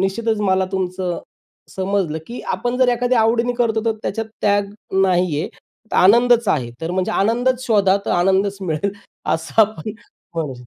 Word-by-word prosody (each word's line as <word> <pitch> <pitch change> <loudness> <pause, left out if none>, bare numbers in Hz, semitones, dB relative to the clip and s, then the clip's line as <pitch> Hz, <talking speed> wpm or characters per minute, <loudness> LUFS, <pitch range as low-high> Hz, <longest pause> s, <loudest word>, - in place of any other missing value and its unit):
निश्चितच 220 +3 0
मला 190 -2 +2
तुमचं 185 -1 -2 0.6
समजलं, 190 -4 -1
की 240 - -7
आपण 245 0 -2
जर 255 -1 +4
एखाद्या 245 0 +2
आवडीने 230 +2 +2
करतो 230 -2 0
तर 225 - +2
त्याच्यात 225 -1 -3
त्याग 205 0 +1 0.3
नाही 180 -5 +2
आहे, - - -3 0.4
तर - - -1
आनंदच 235 +3 +5
आहे. 125 -5 0
तर 165 - -3
म्हणजे 185 +1 -1
आनंदच 245 +5 +1
शोधा 200 -4 +4
तर - - -2
आनंदच 195 +3 +2
मिळेल. 180 +2 -2 0.4
असं 190 +7 0
आपण 215 -2 -3 0.4
म्हणू 155 -5 -3
शकतो. 125 0 -14
200 Hz, 165 wpm, -20 LUFS, 185-230 Hz, 0.6 s, आनंदच